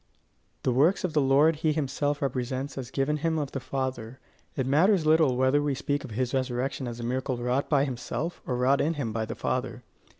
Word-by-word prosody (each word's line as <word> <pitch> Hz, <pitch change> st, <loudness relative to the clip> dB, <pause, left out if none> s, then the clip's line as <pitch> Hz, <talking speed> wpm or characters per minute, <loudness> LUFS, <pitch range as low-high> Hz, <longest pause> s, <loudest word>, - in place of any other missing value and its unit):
The 130 Hz, -, +2 dB
works 150 Hz, +10 st, +3 dB
of 180 Hz, -4 st, -1 dB
the 150 Hz, -, +3 dB
Lord 145 Hz, +4 st, +4 dB
he 155 Hz, 0 st, +1 dB
himself 145 Hz, -1 st, -1 dB
represents 130 Hz, +1 st, -2 dB
as 130 Hz, -3 st, -6 dB
given 145 Hz, +2 st, 0 dB
him 160 Hz, +1 st, 0 dB
of 145 Hz, -3 st, -2 dB
the 135 Hz, -, -3 dB
Father: 130 Hz, -2 st, -4 dB, 0.4 s
it 130 Hz, -, -1 dB
matters 165 Hz, +6 st, +3 dB
little 155 Hz, -5 st, +4 dB
whether 130 Hz, +3 st, +3 dB
we 145 Hz, -2 st, 0 dB
speak 145 Hz, +2 st, -2 dB
of 135 Hz, -, -8 dB
his 125 Hz, +3 st, -2 dB
resurrection 130 Hz, 0 st, -1 dB
as 120 Hz, 0 st, -6 dB
a -, -, -5 dB
miracle 130 Hz, +1 st, -2 dB
wrought 125 Hz, +3 st, -1 dB
by 140 Hz, -2 st, +3 dB
himself, 135 Hz, +6 st, -4 dB
or 125 Hz, -, -1 dB
wrought 130 Hz, +3 st, +3 dB
in 165 Hz, +3 st, 0 dB
him 120 Hz, -7 st, -3 dB
by 110 Hz, 0 st, -1 dB
the -, -, -6 dB
Father. -, -, -3 dB
135 Hz, 210 wpm, -27 LUFS, 125-150 Hz, 0.4 s, Lord